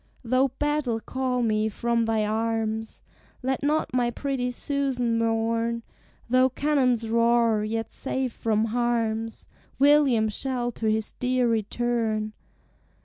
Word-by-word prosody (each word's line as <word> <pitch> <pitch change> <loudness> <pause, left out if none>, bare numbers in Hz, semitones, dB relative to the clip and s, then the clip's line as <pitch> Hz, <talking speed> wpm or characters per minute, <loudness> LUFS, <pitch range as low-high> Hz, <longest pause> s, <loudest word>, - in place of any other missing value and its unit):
"Though 255 +3 +3
battle 275 -3 -1
call 255 +1 -2
me 215 -1 +1
from 235 +2 0
thy 220 -1 +1
arms, 220 0 -2 0.4
Let 260 0 -1
not 300 0 0
my 245 -1 +2
pretty 255 0 -2
Susan 250 -3 -1
mourn; 230 +1 0 0.4
Though 255 +2 +4
cannons 255 -4 +1
roar, 230 -1 +3
yet 225 +1 -3
safe 265 -2 -3
from 220 -1 0
harms 225 -2 -1 0.3
William 275 -5 +4
shall 245 +2 -1
to 225 -1 -3
his 215 0 0
dear 250 -1 0
return. 225 -1 -1
235 Hz, 120 wpm, -26 LUFS, 225-255 Hz, 0.4 s, Though